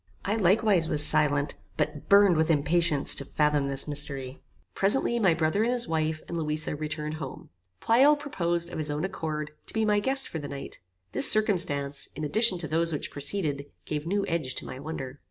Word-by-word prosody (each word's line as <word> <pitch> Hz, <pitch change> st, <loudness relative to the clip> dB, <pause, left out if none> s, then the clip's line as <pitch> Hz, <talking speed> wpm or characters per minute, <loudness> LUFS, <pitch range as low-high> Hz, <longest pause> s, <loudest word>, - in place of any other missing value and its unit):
I 205 Hz, -, -1 dB
likewise 195 Hz, -3 st, +2 dB
was 150 Hz, -2 st, +1 dB
silent, 145 Hz, -2 st, +2 dB, 0.2 s
but 150 Hz, -1 st, -4 dB
burned 200 Hz, -3 st, +5 dB
with 160 Hz, +1 st, 0 dB
impatience 160 Hz, -1 st, +2 dB
to -, -, 0 dB
fathom 150 Hz, 0 st, 0 dB
this 135 Hz, +1 st, 0 dB
mystery. 140 Hz, -3 st, -1 dB, 0.3 s
Presently 235 Hz, +4 st, +2 dB
my 190 Hz, -7 st, +2 dB
brother 160 Hz, +5 st, 0 dB
and 235 Hz, +2 st, +1 dB
his 245 Hz, -1 st, +4 dB
wife, 155 Hz, -1 st, -2 dB
and 170 Hz, -, -5 dB
Louisa, 155 Hz, -1 st, -2 dB
returned 150 Hz, +1 st, -5 dB
home. 135 Hz, -, -9 dB, 0.3 s
Pleyel 265 Hz, +6 st, +4 dB
proposed, 175 Hz, -, -1 dB
of -, -, -6 dB
his 155 Hz, -1 st, -2 dB
own 150 Hz, +4 st, -3 dB
accord, 155 Hz, -5 st, -5 dB, 0.2 s
to -, -, -2 dB
be 220 Hz, 0 st, 0 dB
my 210 Hz, -1 st, +2 dB
guest 270 Hz, +5 st, -1 dB
for 160 Hz, -, -6 dB
the 145 Hz, -, -7 dB
night. 140 Hz, -1 st, -9 dB, 0.3 s
This 130 Hz, -, +8 dB
circumstance, 155 Hz, -10 st, +3 dB
in 155 Hz, -, -6 dB
addition 210 Hz, +5 st, +1 dB
to 170 Hz, -2 st, -6 dB
those 165 Hz, +2 st, -1 dB
which 150 Hz, -, -5 dB
preceded, 145 Hz, -2 st, -3 dB, 0.2 s
gave 150 Hz, +1 st, -5 dB
new 200 Hz, +2 st, -1 dB
edge 155 Hz, -7 st, -3 dB
to -, -, -5 dB
my 130 Hz, -, -9 dB
wonder. 140 Hz, -2 st, -8 dB
155 Hz, 190 wpm, -26 LUFS, 145-195 Hz, 0.3 s, This